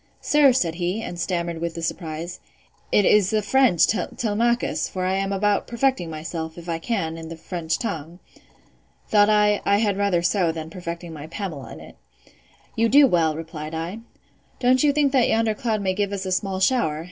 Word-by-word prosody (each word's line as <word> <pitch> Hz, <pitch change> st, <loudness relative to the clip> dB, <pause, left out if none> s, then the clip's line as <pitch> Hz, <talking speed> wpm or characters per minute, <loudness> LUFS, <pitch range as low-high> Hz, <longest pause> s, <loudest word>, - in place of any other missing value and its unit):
Sir, 295 Hz, -2 st, +4 dB
said 180 Hz, -10 st, 0 dB
he, 180 Hz, +6 st, -2 dB
and 175 Hz, -, -6 dB
stammered 170 Hz, -2 st, -2 dB
with 170 Hz, -1 st, -3 dB
the 165 Hz, -, -5 dB
surprise, 165 Hz, +1 st, -4 dB, 0.5 s
it 205 Hz, -, +4 dB
is 205 Hz, -3 st, +4 dB
the 215 Hz, -1 st, 0 dB
French 245 Hz, -7 st, +4 dB
Telemachus; 225 Hz, +4 st, -1 dB
for 185 Hz, -1 st, -3 dB
I 185 Hz, -, +1 dB
am 195 Hz, +1 st, -1 dB
about 205 Hz, +1 st, +1 dB
perfecting 235 Hz, -7 st, 0 dB
myself, 160 Hz, +1 st, -6 dB
if 170 Hz, 0 st, -10 dB
I 165 Hz, -1 st, -2 dB
can, 165 Hz, -5 st, -2 dB
in 160 Hz, 0 st, -8 dB
the 165 Hz, -, -8 dB
French 165 Hz, -1 st, -3 dB
tongue.—Thought 180 Hz, +3 st, -3 dB
I, 210 Hz, -1 st, +3 dB
I 200 Hz, -, +3 dB
had 205 Hz, -2 st, +1 dB
rather 200 Hz, -4 st, +1 dB
so, 175 Hz, -1 st, +2 dB
than 160 Hz, 0 st, -7 dB
perfecting 170 Hz, -1 st, -7 dB
my 150 Hz, 0 st, -8 dB
Pamela 170 Hz, -5 st, -6 dB
in -, -, -10 dB
it.—You -, -, -7 dB
do 285 Hz, +3 st, +7 dB
well, 165 Hz, -, +2 dB
replied 160 Hz, -1 st, -7 dB
I.—Don't 230 Hz, +7 st, -3 dB
you 295 Hz, -, +5 dB
think 285 Hz, -1 st, +2 dB
that 260 Hz, -3 st, +3 dB
yonder 225 Hz, -1 st, +2 dB
cloud 220 Hz, -3 st, -2 dB
may 190 Hz, -1 st, +1 dB
give 200 Hz, +1 st, -1 dB
us 195 Hz, -1 st, -4 dB
a 185 Hz, -, -3 dB
small 190 Hz, 0 st, -1 dB
shower? 190 Hz, -8 st, +1 dB
185 Hz, 180 wpm, -23 LUFS, 165-215 Hz, 0.5 s, do